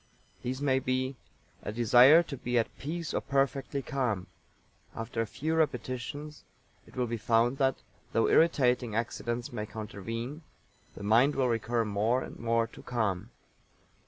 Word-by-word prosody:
These 130 +3 -3
may 130 -2 +3
be: 130 +1 -1 0.5
A - - -4
desire 120 +8 +7
to 150 - -6
be 125 -1 -1
at 115 - 0
peace 165 +3 -4
or - - 0
perfectly 135 0 0
calm. 120 -10 -1 0.7
After 115 0 -3
a 115 - -2
few 155 +8 -2
repetitions 150 -1 -2 0.4
it - - -17
will 125 - 0
be 115 0 -3
found 115 +4 +2
that, 135 -1 +1 0.3
though 115 - +2
irritating 125 -8 +3
accidents 120 +1 -3
may 105 -2 -4
countervene, 115 - -6 0.5
the - - -8
mind 115 +8 +4
will 130 -2 +2
recur 115 0 0
more 110 +5 +1
and - - -10
more 115 0 +1
to - - -13
calm. 110 -7 -2
120 Hz, 150 wpm, -30 LUFS, 115-135 Hz, 0.7 s, desire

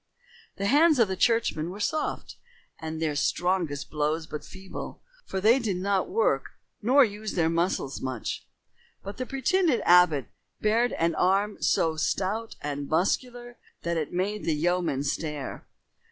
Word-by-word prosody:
The 200 - -3
hands 300 +7 +5
of 210 -6 +2
churchmen 225 -9 +2
were 195 +3 -8
soft, 310 +8 -2 0.4
and 160 0 -5
their 155 -2 -1
strongest 170 -1 0
blows 155 +1 -1
but 150 -1 -7
feeble, 190 0 -9 0.2
for 190 - -2
they 225 +7 +5
did 210 -7 -1
not 195 - 0
work 460 +6 +1 0.3
nor 260 +5 +6
use 210 0 -5
their 165 -2 +2
muscles 165 -5 -1
much. 130 -4 -4 0.6
But 200 +1 -7
the 255 - -4
pretended 280 +1 +2
abbot 175 -7 +5 0.3
bared 230 +3 +2
an 165 0 +1
arm 195 +5 +1
so 160 -1 +2
stout 205 +7 -1
and 145 -1 -4
muscular 240 +8 -1 0.3
that 170 0 -1
it 155 -3 -2
made 195 +4 -2
the 160 - +1
yeomen 170 -3 0
stare. 150 -1 -4
185 Hz, 145 wpm, -27 LUFS, 160-225 Hz, 0.6 s, nor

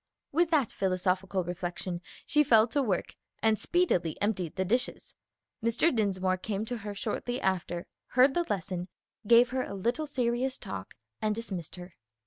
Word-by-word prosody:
With 335 +3 +3
that 295 -8 +2
philosophical 185 0 0
reflection 175 0 -4 0.2
she 300 0 +4
fell 225 -4 +6
to 285 +5 +1
work, 205 -9 -1 0.3
and 220 -1 +3
speedily 260 - +1
emptied 190 -6 -1
the 190 -1 0
dishes. 245 +7 -1 0.5
Mr. 235 +7 +2
Dinsmore 190 -4 +1
came 205 +2 -3
to 245 +2 -3
her 205 -2 -6
shortly 245 +4 -2
after, 175 -2 -1 0.3
heard 265 +2 +7
the 345 +3 +1
lesson, 185 -2 -2 0.4
gave 240 +2 +7
her 260 0 0
a 200 - -5
little 240 +10 -1
serious 255 0 0
talk 95 -1 -7 0.3
and 215 -1 +1
dismissed 190 -8 -5
her. 180 -1 -10
210 Hz, 155 wpm, -30 LUFS, 185-245 Hz, 0.5 s, heard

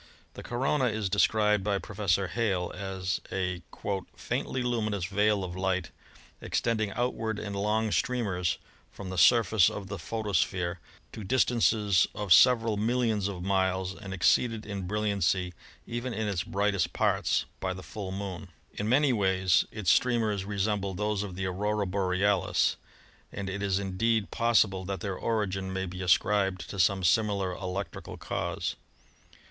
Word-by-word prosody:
The - - -9
corona 130 +3 0
is 110 -4 -1
described 105 0 +3
by 100 -1 +1
Professor 100 -2 -1
Hale 95 -7 -1
as 95 -1 -3
a 90 -1 -2 0.5
"faintly 130 -1 -2
luminous 110 -6 -1
veil 105 +1 +1
of 90 -1 -5
light 95 -1 -1 0.5
extending 110 -3 0
outward 115 -3 -1
in 105 -1 -5
long 105 +2 0
streamers 100 -10 0 0.3
from 95 -2 -8
the 95 - -5
surface 110 -6 +5
of 100 -1 -7
the 100 -2 -5
photosphere 95 -2 -1 0.3
to 110 - -8
dis 130 +7 +3
tances 105 -5 +3
of 105 -4 +3
several 115 +2 +5
millions 110 -2 +1
of 95 -3 -5
miles, 95 -1 0
and 100 -1 -9
exceeded 110 +4 +2
in 100 -3 -5
bril 105 +2 -1
liancy, 90 -3 0 0.3
even 120 +1 -4
in 110 -1 -1
its 95 -4 -1
brightest 100 -2 0
parts, - - +1
by 95 - -2
the 95 0 -7
full 100 -3 -6
Moon. 95 -1 -5 0.3
In 105 +1 -3
many 135 +2 +4
ways 95 -3 +2
its 105 -5 +1
streamers 110 -6 +2
resemble 100 -1 -1
those 105 +1 -1
of 100 -3 -5
the 95 0 -3
Aurora 105 +3 -1
Borealis, 95 0 +1 0.6
and 100 - -5
it 100 +1 -4
is 100 -2 +1
indeed 100 +3 0
possible 110 -5 +2
that 95 +1 -4
their 100 -2 -3
origin 95 -3 -2
may 95 0 -2
be 90 0 -7
ascribed 95 +1 +2
to 100 - -6
some 95 +2 +3
similar 100 0 +2
electrical 95 +2 -5
cause. - - -3
100 Hz, 150 wpm, -29 LUFS, 95-110 Hz, 0.6 s, surface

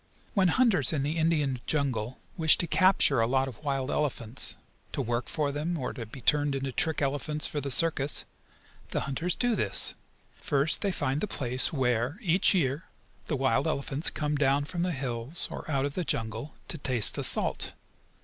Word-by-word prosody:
When 195 -5 +2
hunters 180 - +3
in 145 -3 -1
the 150 +4 -2
Indian 150 -5 0
jungle 130 -6 -2 0.2
wish 160 -4 +5
to - - -1
capture 170 -7 +3
a 115 - +1
lot 135 +2 0
of 130 +2 -11
wild 135 -2 -2
elephants, 130 -5 -2 0.4
to - - -4
work 120 +1 -3
for 150 -2 -2
them, 155 +4 -3
or 130 - -4
to 115 -4 -8
be 125 +4 -11
turned 145 0 +1
into 135 0 -3
trick 155 +3 -1
elephants 145 +2 0
for 145 - -3
the 140 - -5
circus, 145 0 +4 0.6
the - - -2
hunters 160 +6 -2
do 245 -2 0
this. - - +5 0.5
First 145 0 0
they 200 - 0
find 145 -4 -2
the - - -2
place 130 -6 0
where, 125 - -1
each 185 -1 +2
year, 145 -3 -1 0.4
the 150 - -1
wild 130 +1 0
elephants 140 0 +1
come 150 -1 -3
down 140 0 +1
from 170 +3 -5
the 180 +1 -1
hills, 135 +1 -2
or - - -8
out 140 -2 0
of 140 - -4
the 180 - -3
jungle, 115 +1 -4
to 165 - -4
taste 125 -5 +3
the - - -4
salt. - - +5
145 Hz, 190 wpm, -27 LUFS, 130-160 Hz, 0.6 s, wish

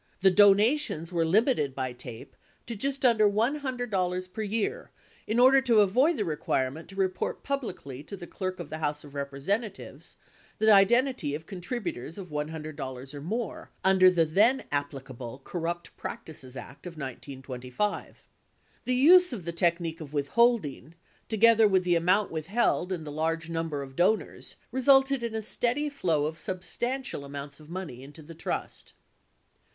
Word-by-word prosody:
The 190 - +7
donations 205 - +4
were 170 -1 +2
limited 165 - +2
by 130 -2 -3
TAPE 120 -1 -10 0.3
to 230 - -5
just 275 +4 -1
under 220 -4 +5
$100 215 -7 -1
per 220 - -4
year 225 - -2 0.4
in 220 +3 +1
order 265 +2 +7
to 235 -5 +4
avoid 255 - +3
the 210 - -1
requirement 150 -1 -2
to 195 - -11
report 190 -1 -1
publicly 185 - -4
to 200 - -8
the 175 - -8
Clerk 185 0 -4
of 165 -4 -7
the 155 - -4
House 150 -1 -2
of 145 -2 -13
Representatives 145 - -4 0.4
the 220 0 +5
identity 205 - +3
of 160 +2 -8
contributors 180 - -5
of 190 -3 -8
$100 150 -3 -5
or 145 - -7
more 220 +8 -4
under 190 -1 +6
the 170 -3 +3
then 215 +12 +3
applicable 135 -4 -5
Corrupt 170 0 -4
Practices 135 -5 -8
Act 140 +7 -10
of 175 - -7
1925. 130 - -4
11 - - -20 0.7
The 250 - +1
use 360 +7 +7
of 205 -9 -5
the 170 - -2
technique 170 -1 0
of 150 -2 -9
withholding, 155 - +1 0.3
together 225 0 +5
with 190 -2 +2
the 175 -1 +2
amount 185 +4 +2
withheld 180 +3 0
and 170 -4 -3
the 150 - -6
large 165 +2 -2
number 165 -4 -2
of 135 -1 -11
donors, 200 +7 0 0.2
resulted 270 0 +4
in 230 -1 -3
a 220 - -3
steady 245 +7 0
flow 165 - 0
of 160 +1 -4
substantial 240 - -3
amounts 140 0 -8
of 155 0 -15
money 170 -9 -6
into 145 +4 -12
the 165 +3 -11
trust. - - -5
180 Hz, 155 wpm, -28 LUFS, 150-225 Hz, 0.7 s, The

